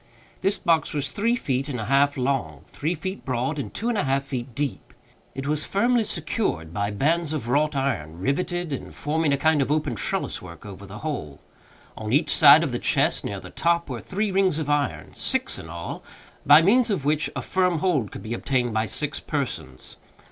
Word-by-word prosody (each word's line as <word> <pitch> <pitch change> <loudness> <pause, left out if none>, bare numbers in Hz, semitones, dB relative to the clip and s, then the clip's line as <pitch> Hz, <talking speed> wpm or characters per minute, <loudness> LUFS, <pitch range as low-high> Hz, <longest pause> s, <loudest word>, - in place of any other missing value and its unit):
This 195 - +2
box 165 -4 +1
was 140 -2 0
three 230 +4 +1
feet 135 - -2
and 125 -4 -3
a 110 - -3
half 140 +3 +3
long, 135 0 -1
three 160 +5 -2
feet 185 +5 -5
broad, 130 +4 -1
and - - -4
two 230 - -4
and 235 -4 +1
a - - +1
half 135 0 +1
feet 130 -3 -5
deep. 145 -2 -4 0.4
It 135 +1 -4
was 150 +1 0
firmly 235 +3 +2
secured 155 - -2
by 100 0 -1
bands 155 +9 +1
of 140 -7 -3
wrought 150 +4 +2
iron, 105 - -2
riveted, 170 - -1
and 135 - -6
forming 155 0 0
a 140 - +3
kind 155 +1 +3
of 135 - 0
open 150 -3 0
trelliswork 90 -4 -4
over 100 -1 -9
the 100 +2 -9
whole. 80 - -4 0.6
On - - -5
each - - +3
side - - +8
of - - -1
the - - -2
chest, - - +1
near - - -4
the - - -11
top, 170 -3 +1
were 120 - -4
three 200 +2 -2
rings 190 -4 +2
of 150 -2 -1
iron—six 145 -2 -1
in 80 - -9
all—by 135 - +1
means 235 +6 +4
of 190 -10 -1
which 150 +1 +1
a - - -3
firm 180 -3 +1
hold 150 - 0
could - - -8
be 110 - -4
obtained 120 -1 0
by 110 0 +1
six 150 +4 -2
persons. 120 - -4
145 Hz, 200 wpm, -24 LUFS, 125-170 Hz, 0.6 s, side